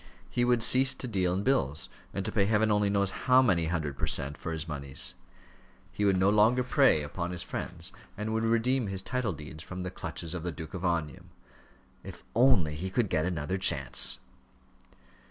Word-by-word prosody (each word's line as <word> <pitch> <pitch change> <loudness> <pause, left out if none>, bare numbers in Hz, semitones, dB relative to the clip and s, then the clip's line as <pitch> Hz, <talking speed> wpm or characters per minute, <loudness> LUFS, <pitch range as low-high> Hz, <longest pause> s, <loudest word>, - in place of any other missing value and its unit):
He 120 - +1
would 120 -2 +3
cease 130 +2 +5
to 130 - -5
deal 95 -6 0
in 95 +2 -1
bills, 110 - +1 0.2
and 95 - -4
to - - -1
pay 100 -3 +2
heaven 110 +1 +2
only 105 -1 +2
knows 100 -1 +1
how 130 +4 +4
many 85 -9 +2
hundred 80 -4 -3
per - - 0
cent. 70 +1 -2
for 85 - -6
his 80 0 -4
moneys. 70 -3 -3 0.8
He 105 - -1
would 95 -2 +3
no 95 +2 +3
longer 110 +4 +4
prey 125 - +3
upon 85 +4 -4
his 90 -1 -2
friends, 90 +1 -4 0.2
and 110 +1 -3
would 110 0 0
redeem 115 +2 +1
his 95 -1 -4
title 125 -3 -1
deeds 75 +1 -9
from 95 +1 -7
the 90 - -4
clutches 85 0 -5
of 90 - -4
the 90 +1 -3
Duke 80 -1 -9
of 90 - -6
Omnium. 85 -5 -2 0.7
If - - -10
only 115 - +4
he 90 +6 -4
could 105 +1 0
get 80 +1 +1
another 90 0 -2
chance! 70 -8 +2
95 Hz, 195 wpm, -29 LUFS, 80-110 Hz, 0.8 s, cease